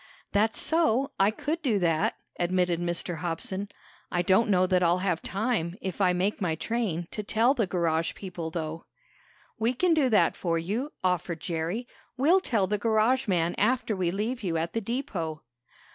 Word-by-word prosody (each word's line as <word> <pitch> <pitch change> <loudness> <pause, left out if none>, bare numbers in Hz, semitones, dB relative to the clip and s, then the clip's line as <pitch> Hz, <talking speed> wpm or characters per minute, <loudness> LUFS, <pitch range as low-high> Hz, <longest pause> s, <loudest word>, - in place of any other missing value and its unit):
"That's 215 +2 +2
so, 285 -5 +2
I 195 +1 +5
could 300 +9 -3
do 240 -9 +1
that," 165 -4 +1 0.2
admitted 175 -1 +1
Mr. 175 0 -1
Hobson. 180 +4 -3 0.4
"I 175 - +1
don't 195 +5 +3
know 185 -2 +4
that 185 -1 +2
I'll 175 0 +3
have 175 -3 0
time, 195 -5 -1
if 190 +1 -4
I 185 -2 +4
make 190 +4 0
my 170 -4 0
train, 180 -3 -2
to 210 - -3
tell 225 +5 +3
the 230 -8 0
garage 165 -2 0
people, 175 -4 -6
though." 160 0 -5 0.7
"We 230 +3 +2
can 355 +6 +3
do 295 -5 +3
that 215 - +3
for 170 -2 -1
you," 215 - -2
offered 180 -2 0
Jerry. 170 +9 -3 0.3
"We'll 320 +9 +5
tell 220 - +1
the 205 +2 -1
garage 230 +4 +2
man 175 -3 +1
after 230 0 +1
we 185 -2 0
leave 220 +7 -2
you 175 -5 -1
at 165 +1 -2
the 225 - -1
depot." 195 - -3
190 Hz, 175 wpm, -27 LUFS, 170-230 Hz, 0.7 s, I